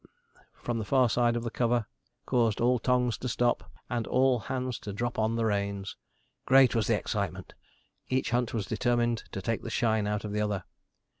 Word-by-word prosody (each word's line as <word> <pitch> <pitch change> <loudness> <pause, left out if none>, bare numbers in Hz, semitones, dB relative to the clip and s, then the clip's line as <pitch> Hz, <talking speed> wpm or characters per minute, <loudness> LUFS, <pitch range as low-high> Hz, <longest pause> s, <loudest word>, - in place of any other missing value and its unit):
from 120 -1 -1
the - - -2
far 130 +4 +3
side 120 +1 +2
of 120 - -2
the 115 - -3
cover 120 -2 +1 0.4
caused 115 -4 +1
all 125 +1 +3
tongues 125 -1 +1
to 125 - -3
stop, 120 +1 0 0.2
and 120 -2 -2
all 130 -1 +3
hands 125 +2 -3
to 105 - -6
drop 120 +3 -3
on 110 +1 +1
the 115 -1 0
reins. 100 -2 -2 0.5
Great 135 -1 +6
was 115 -3 +1
the - - +3
excitement! - - -4 0.6
Each 130 -1 0
hunt 120 -1 +1
was 110 -4 -2
determined 120 +2 0
to 95 - -5
take 115 +1 -1
the - - -6
shine 110 -3 +1
out 105 0 -2
of 105 - -4
the 105 +1 -1
other. 105 -3 -1
115 Hz, 195 wpm, -29 LUFS, 105-125 Hz, 0.6 s, Great